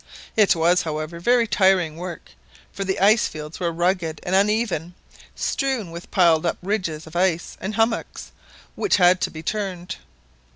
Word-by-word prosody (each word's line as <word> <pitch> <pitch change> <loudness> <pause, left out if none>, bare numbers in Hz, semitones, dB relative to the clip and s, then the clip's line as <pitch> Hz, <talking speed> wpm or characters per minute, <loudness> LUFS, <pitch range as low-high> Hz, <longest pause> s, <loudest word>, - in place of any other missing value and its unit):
It 210 -4 +4
was, 170 +2 +3
however, 155 +1 -4
very 240 +6 +3
tiring 190 -6 +2
work, 175 0 -8 0.4
for 195 - -4
the 190 0 -2
ice 210 +4 +4
fields 150 0 -8
were 170 -2 -1
rugged 170 -2 -1
and 180 - -3
uneven, 195 -4 +1 0.4
strewn 260 - -2
with 170 +1 -9
piled 170 -4 +4
up 170 - -1
ridges 180 -6 -2
of 160 +1 -13
ice 175 -1 0
and 205 +2 -4
hummocks 225 +1 -1 0.4
which 410 - +1
had 180 -1 +4
to - - 0
be 160 0 -9
turned. 185 -2 -4
180 Hz, 160 wpm, -22 LUFS, 165-200 Hz, 0.4 s, It